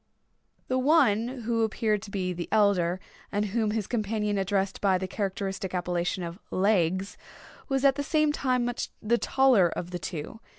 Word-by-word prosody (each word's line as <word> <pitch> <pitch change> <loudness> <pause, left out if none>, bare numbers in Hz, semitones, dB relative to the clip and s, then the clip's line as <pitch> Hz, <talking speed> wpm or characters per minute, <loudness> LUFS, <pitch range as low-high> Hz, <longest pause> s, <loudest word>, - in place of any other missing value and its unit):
The 255 0 +1
one 255 -6 +4 0.2
who 230 0 0
appeared 220 -1 0
to 205 - -9
be 185 -2 -2
the 175 -1 -6
elder, 190 -4 +3 0.3
and 205 +1 0
whom 215 +1 0
his 215 -1 -1
companion 210 -2 -1
addressed 195 0 -1
by 195 -2 +3
the 190 +1 -4
characteristic 195 -2 -3
appellation 180 +1 -1
of 170 +2 -6
"Legs," 190 -1 +1 0.5
was 270 0 +1
at 275 0 +5
the 285 - -1
same 305 0 +2
time 255 -4 0
much 245 0 -3
the 235 +2 +1
taller 255 -10 +4
of 175 +2 -5
the 175 - -4
two. 170 +5 -6
205 Hz, 170 wpm, -27 LUFS, 185-235 Hz, 0.5 s, at